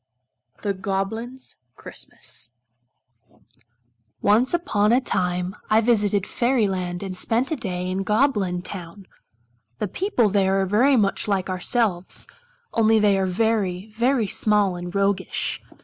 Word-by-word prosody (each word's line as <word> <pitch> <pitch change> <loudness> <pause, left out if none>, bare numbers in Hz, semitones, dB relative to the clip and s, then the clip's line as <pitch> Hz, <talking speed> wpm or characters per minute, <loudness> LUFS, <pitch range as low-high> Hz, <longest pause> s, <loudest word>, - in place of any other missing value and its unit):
1908 200 +6 -3 0.2
Preface 115 - -6 1.7
Once 225 +6 +3
upon 220 - +2
a 245 - +5
time 180 -5 -1
I 215 - +5
visited 210 -4 +2
Fairy 240 -3 +1
land 180 -1 -3
and 190 -1 -5
spent 230 - 0
a - - +1
day 180 -8 -3
in 185 +1 -1
Goblin 205 -5 +1
town. 185 +1 -7 0.7
The 210 - -2
people 250 - +1
there 195 -1 +2
are 215 +8 +3
much 200 -1 +1
like 195 -2 0
ourselves, 185 0 0 0.5
only 225 -1 +4
they 210 -2 +4
are 190 - +1
very, 200 -1 0
very 235 +2 +1
small 205 -1 +2
and 175 0 -6
roguish. 195 -1 0
205 Hz, 120 wpm, -23 LUFS, 185-225 Hz, 1.7 s, a